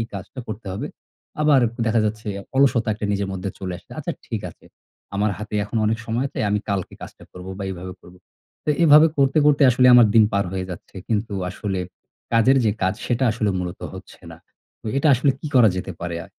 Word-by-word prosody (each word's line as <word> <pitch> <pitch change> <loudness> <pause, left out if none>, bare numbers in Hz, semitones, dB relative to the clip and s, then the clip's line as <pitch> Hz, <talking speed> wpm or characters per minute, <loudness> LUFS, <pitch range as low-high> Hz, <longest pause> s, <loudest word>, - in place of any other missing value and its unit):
এই 115 - -2
কাজটা 100 +7 -7
করতে 110 0 -7
হবে।" 95 - -4 0.6
আবার 150 -3 +5 0.3
দেখা 115 0 +2
যাচ্ছে, 105 0 -4 0.3
অলসতা 130 -5 +3
একটা 105 0 -4
নিজের 100 -1 -1
মধ্যে 95 +1 -4
চলে 95 -2 -4
আসে, - - -23
"আচ্ছা, - - -3
ঠিক - - -3
আছে! - - -21 0.5
আমার 105 +1 +1
হাতে 105 0 -7
এখন 115 - -5
অনেক 110 +1 0
সময় 115 +3 -1
আছে। - - -9
আমি 105 - +2
কালকে 100 -3 -2
কাজটা - - -11
করব 90 0 -10
বা 100 - -5
এইভাবে 90 0 -7
করব।" 90 - -16 0.5
তো - - -8 0.2
এভাবে 155 +1 +8
করতে, 135 +2 +3
করতে 145 -1 +4
আসলে 125 +1 +4
আমার 120 -2 +8
দিন 110 -1 +7
পার 100 0 +1
হয়ে 95 -1 -3
যাচ্ছে। 90 - -10
কিন্তু 110 0 -1 0.2
আসলে 95 0 -3 0.5
কাজের 120 +4 +4
যে 110 - +3
কাজ, 95 +1 +1
সেটা 125 +1 0
আসলে 110 -2 0
মূলত 90 -1 -5
হচ্ছে - - -12
না। - - -13 0.5
ও - - -7
এটা 140 +3 +2
আসলে 130 +3 +2
কি - - -6
করা 120 -3 +7
যেতে 90 0 -4
পারে? 85 -1 -4
আ - - -13
110 Hz, 210 wpm, -22 LUFS, 95-125 Hz, 0.6 s, এভাবে